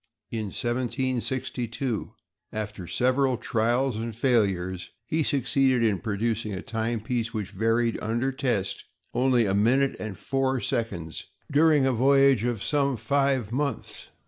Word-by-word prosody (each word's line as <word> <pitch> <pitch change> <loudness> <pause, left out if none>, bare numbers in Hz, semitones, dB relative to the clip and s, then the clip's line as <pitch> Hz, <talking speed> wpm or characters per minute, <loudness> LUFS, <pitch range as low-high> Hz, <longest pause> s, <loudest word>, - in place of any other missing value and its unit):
In 110 -2 -2
1762, 125 +1 -2 0.4
after 105 -4 -5
several 130 +3 +2
trials 120 +2 0
and 115 0 -4
failures, 95 -8 +1 0.2
he 160 0 0
succeeded 135 -3 +2
in 105 -4 +2
producing 110 +2 -2
a 95 - -6
timepiece 115 +1 -2
which 105 -3 -3
varied, 115 +3 +1
under 120 +5 0
test, 125 -8 -1 0.3
only 125 -2 +3
a 95 - +1
minute 125 +7 +3
and 110 -4 -5
four 135 +3 0
seconds 85 -10 -3 0.2
during 150 -1 +4
a 135 - +3
voyage 135 -1 +4
of 120 -4 -1
some 140 -3 +1
five 135 -4 +1
months. 140 -1 -3
120 Hz, 125 wpm, -26 LUFS, 110-135 Hz, 0.4 s, during